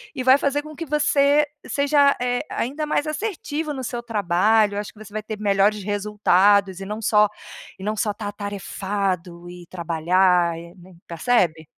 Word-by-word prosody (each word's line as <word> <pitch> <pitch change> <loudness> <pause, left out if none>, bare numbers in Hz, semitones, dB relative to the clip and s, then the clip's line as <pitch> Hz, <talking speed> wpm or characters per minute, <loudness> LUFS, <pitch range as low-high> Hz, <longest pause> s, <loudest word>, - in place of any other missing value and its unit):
e 260 - -3
vai 260 +1 +6
fazer 285 +1 0
com 305 0 -10
que 330 - -6
você 295 0 +3 0.2
seja, 285 0 +3
eh, 245 0 0
ainda 285 +6 -3
mais 295 - 0
assertivo 310 -3 -3
no 265 -2 -6
seu 240 0 -4
trabalho. 210 0 +2
Acho 210 +3 -7
que 215 - -19
você 210 -1 -15
vai 215 - -3
ter 215 0 -6
melhores 205 0 +2
resultados 200 -1 +2
e 195 - -6
não 210 +3 -5
só 210 -1 +4 0.5
e - - -9
não 215 +2 -2
só 210 0 0
estar 205 0 -6
atarefado 195 -3 -4
e 175 0 -11
trabalhar 175 0 +1
e, 170 +1 -11
né 185 0 -16
percebe? 170 -4 0
210 Hz, 175 wpm, -22 LUFS, 185-260 Hz, 0.5 s, vai